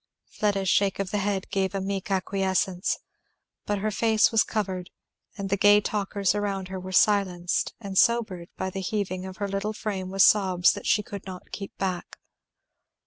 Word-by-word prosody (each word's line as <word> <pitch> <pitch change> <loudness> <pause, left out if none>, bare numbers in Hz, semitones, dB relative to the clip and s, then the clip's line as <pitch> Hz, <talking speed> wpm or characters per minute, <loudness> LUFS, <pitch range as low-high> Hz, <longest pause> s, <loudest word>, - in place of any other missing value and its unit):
Fleda's 200 -3 0
shake 195 +1 +2
of 195 -2 -3
the 210 - 0
head 200 -1 -1
gave 195 0 0
a - - 0
meek 195 0 -3
acquiescence. 190 -1 0 0.7
But 205 - 0
her 215 +2 -1
face 220 +1 +3
was 225 -2 +4
covered, 190 -4 -3 0.5
and 195 -2 -4
the 200 - +2
gay 205 +1 +6
talkers 200 -2 0
around 200 -2 -2
her 190 0 -5
were 185 +1 -7
silenced 185 -3 +2
and 200 -4 -7
sobered 205 -6 +2
by 190 - -3
the 195 - -4
heaving 190 -2 -2
of 190 - -9
her 200 - -2
little 200 +2 -2
frame 195 -3 -4
with 195 0 +4
sobs 185 -4 +5
that 205 - -6
she 210 - +3
could 200 -1 -8
not 185 -1 -9
keep 195 -1 -7
back. 185 -2 -3
195 Hz, 180 wpm, -26 LUFS, 190-205 Hz, 0.7 s, gay